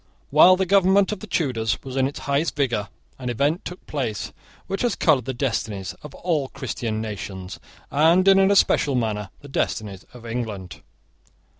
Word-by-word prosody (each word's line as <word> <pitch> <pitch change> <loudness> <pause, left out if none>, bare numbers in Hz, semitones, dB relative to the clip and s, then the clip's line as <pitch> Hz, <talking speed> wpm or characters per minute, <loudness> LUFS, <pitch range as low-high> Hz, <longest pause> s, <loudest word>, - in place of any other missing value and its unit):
While 165 +6 +8
the 190 +1 0
government 195 +1 +4
of 210 - -4
the 215 - -9
Tudors 120 - 0
was 130 -1 -7
in 135 -1 +2
its 140 - -7
highest 140 +4 0
vigour 120 -8 0 0.3
an 125 -1 -4
event 140 +8 0
took 180 - -8
place 120 -9 -3 0.3
which 195 +1 -3
has 240 -3 +1
coloured 140 -7 +3
the 130 - -3
destinies 110 -7 -2
of 150 - -10
all 160 -6 -1
Christian 115 -5 -4
nations, 95 -3 -6 0.3
and 165 +6 +4
in 195 0 +7
an 195 0 +5
especial 150 -8 +3
manner 105 -4 -1
the 145 - -11
destinies 105 -7 -2
of 120 -1 -13
England. 105 - -5
135 Hz, 170 wpm, -23 LUFS, 110-170 Hz, 0.3 s, While